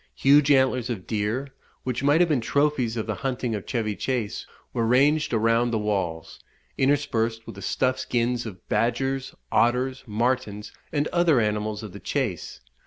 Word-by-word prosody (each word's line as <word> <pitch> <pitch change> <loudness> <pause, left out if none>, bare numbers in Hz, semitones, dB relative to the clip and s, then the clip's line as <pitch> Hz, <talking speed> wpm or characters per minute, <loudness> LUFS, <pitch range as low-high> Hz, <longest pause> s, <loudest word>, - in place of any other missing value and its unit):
Huge 145 - +5
antlers 130 -3 +3
of 105 -7 -4
deer, 110 +6 -2 0.3
which 125 -1 -2
might 145 +4 +4
have 175 - +5
been 140 -6 +2
trophies 135 -3 +1
of 110 - -2
the - - -2
hunting 125 -3 -2
of 105 -3 -5
Chevy 110 -4 -1
Chace, 120 0 -3 0.3
were 115 - 0
ranged 145 +6 +3
around 115 +1 +2
the 115 - 0
walls, 95 -6 -2 0.4
interspersed 120 -5 0
with - - -8
the - - -10
stuffed 130 0 0
skins 120 0 -1
of 95 -4 -11
badgers, 135 +3 -1 0.2
otters, 125 +2 +1
martins, 110 -2 -1 0.2
and 145 0 0
other 170 -6 +3
animals 105 0 -1
of 105 -4 -8
the 100 - -8
chase. 115 - -3
120 Hz, 165 wpm, -25 LUFS, 110-135 Hz, 0.4 s, Huge